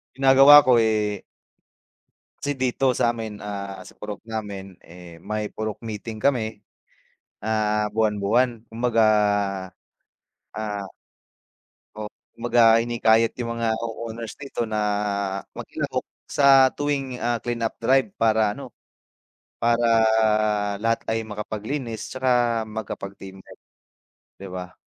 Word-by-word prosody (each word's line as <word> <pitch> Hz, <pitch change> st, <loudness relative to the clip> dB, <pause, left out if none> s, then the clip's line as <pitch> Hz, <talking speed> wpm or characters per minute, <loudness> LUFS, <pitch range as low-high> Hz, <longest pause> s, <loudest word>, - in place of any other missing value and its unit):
ginagawa 135 Hz, +2 st, +8 dB
ko, 125 Hz, -2 st, +5 dB
eh 105 Hz, -2 st, +1 dB, 1.2 s
Kasi 145 Hz, -, -2 dB
dito 130 Hz, +1 st, +2 dB
sa'min, 115 Hz, -3 st, -1 dB
ah, 100 Hz, -1 st, -6 dB
sa -, -, -14 dB
purok 105 Hz, -1 st, -6 dB
namin, 100 Hz, -4 st, -6 dB
eh, 85 Hz, -1 st, -13 dB
may 105 Hz, 0 st, -3 dB
purok 110 Hz, -1 st, -4 dB
meeting 110 Hz, 0 st, -6 dB
kami, 110 Hz, -4 st, 0 dB, 0.8 s
ah, 105 Hz, -1 st, 0 dB
buwan-buwan. 110 Hz, +2 st, +1 dB
Kumbaga, 115 Hz, 0 st, +1 dB, 1.5 s
ah 105 Hz, -2 st, -4 dB, 1.1 s
O, -, -, -5 dB, 0.3 s
kumbaga 120 Hz, +1 st, +2 dB, 0.2 s
hinihikayat 115 Hz, -1 st, +3 dB
yung 115 Hz, -1 st, -2 dB
mga 115 Hz, -1 st, -1 dB
co-owners 115 Hz, -1 st, -6 dB
dito 140 Hz, -3 st, -5 dB
na 105 Hz, -, 0 dB, 0.8 s
makilahok -, -, -4 dB, 0.2 s
sa 135 Hz, -2 st, +6 dB
tuwing, 140 Hz, -3 st, -2 dB
ah, 120 Hz, 0 st, +1 dB
clean-up 115 Hz, -2 st, -2 dB
drive 130 Hz, -, +3 dB
para 110 Hz, -2 st, +3 dB
ano, -, -, -9 dB, 0.9 s
para 120 Hz, 0 st, +2 dB, 1.0 s
lahat 115 Hz, 0 st, +1 dB
ay 110 Hz, -, +1 dB
makapaglinis, 110 Hz, +3 st, -5 dB
'tsaka 125 Hz, -3 st, +1 dB
makapag-team 100 Hz, -3 st, -7 dB
work, -, -, -16 dB, 0.8 s
'di 100 Hz, -, -9 dB
ba? 90 Hz, 0 st, -7 dB
110 Hz, 105 wpm, -24 LUFS, 105-120 Hz, 1.5 s, ginagawa